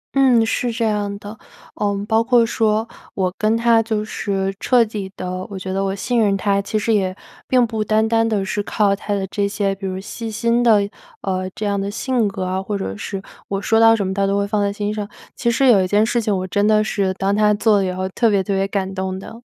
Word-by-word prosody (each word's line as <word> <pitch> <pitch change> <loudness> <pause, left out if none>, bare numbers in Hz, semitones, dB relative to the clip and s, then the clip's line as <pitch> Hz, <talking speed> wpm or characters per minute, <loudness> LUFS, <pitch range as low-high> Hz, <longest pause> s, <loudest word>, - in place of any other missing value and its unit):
嗯， 255 -4 +5
是 240 +2 -1
这 230 0 -1
样 205 -2 -1
的。 205 +1 -9 0.4
呃， 200 -1 -2
包 220 0 +3
括 240 -1 +4
说 220 -1 +1 0.3
我 185 -2 0
跟 215 +1 +1
他 230 -1 +4
就 220 -1 -2
是 195 -2 -2
彻 245 -2 +4
底 205 -3 -6
地 185 - -5 0.2
我 200 - -6
觉 190 0 -5
得 195 +1 0
我 195 0 -1
信 240 +4 -1
任 200 -2 +2
他， 200 0 +1
其 205 +2 -2
实 220 +2 +1
也 190 -3 0 0.3
并 250 -2 +4
不 220 -2 -2
单 215 +1 +2
单 225 0 +2
地 205 -3 0
是 205 +2 -2
靠 205 -1 +1
他 205 +1 -3
的 195 -1 -2
这 200 +1 -1
些， 200 -1 -1
比 195 0 -6
如 185 0 -4
细 225 +4 -6
心 235 +2 +1
的， 215 -4 +4 0.3
呃， 185 -1 -2
这 215 - -4
样 200 -1 0
的 200 - -3
性 240 +1 0
格 195 -1 -4
啊， 185 +1 -2
或 200 +1 -3
者 100 - -4
是 195 - -5 0.3
我 195 - -2
说 225 +2 +2
到 225 0 +7
什 205 -3 -1
么 190 - -2
他 195 0 +1
都 200 +1 +1
会 200 - +1
放 210 0 0
在 200 0 +1
心 205 +1 -3
上。 210 -1 -4 0.3
其 235 - 0
实 235 +4 +2
有 230 -7 +6
一 - - -1
件 205 +3 +3
事 235 +1 0
情 210 -2 0
我 185 - -3
真 205 +3 +1
的 215 0 +4
是， 200 -3 0
当 195 +1 0
他 210 0 +4
做 210 0 +3
了 195 - +1
以 185 - -1
后 185 +1 -3
特 230 +4 +2
别 200 -2 +2
特 200 - -2
别 195 0 +1
感 195 -1 -2
动 190 0 -3
的。 225 +5 -10
205 Hz, 275 characters per minute, -20 LUFS, 195-225 Hz, 0.4 s, 到